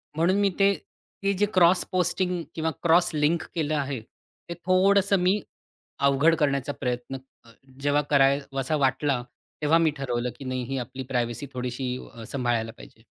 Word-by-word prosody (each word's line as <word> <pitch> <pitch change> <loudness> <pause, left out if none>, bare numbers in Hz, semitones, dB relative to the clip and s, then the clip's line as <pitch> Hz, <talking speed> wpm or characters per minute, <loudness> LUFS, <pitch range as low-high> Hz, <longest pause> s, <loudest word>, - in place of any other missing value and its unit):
म्हणून 170 +4 +2
मी 200 -1 +3
ते 200 0 +5 0.5
ती 200 - +2
जे 205 - +4
क्रॉस 180 0 +5
पोस्टिंग 180 0 0
किंवा 160 0 0
क्रॉस 170 +1 +4
लिंक 155 +2 +1
केलं 155 -2 0
आहे, 140 -3 -2 0.5
ते - - -2
थोडंसं 195 +1 +4
मी 185 +4 +2 0.7
अवघड 145 +5 +4
करण्याचा 140 -1 0
प्रयत्न 125 +1 -3 0.3
अ, 115 - -17 0.3
जेव्हा 145 +1 +2
कराय 140 0 +4
वासा 135 +3 -1
वाटला 135 -1 +1 0.4
तेव्हा 160 +3 +4
मी 165 -2 +3
ठरवलं, 125 -2 -2
की 140 - -9
नाही 130 -1 -2
ही 135 -1 -2
आपली 130 +2 -6
प्रायव्हसी 120 +1 -1
थोडीशी 125 0 -3 0.2
अ, 115 -1 -9
सांभाळायला 120 -3 -1
पाहिजे. - - -15
145 Hz, 160 wpm, -26 LUFS, 130-170 Hz, 0.7 s, ते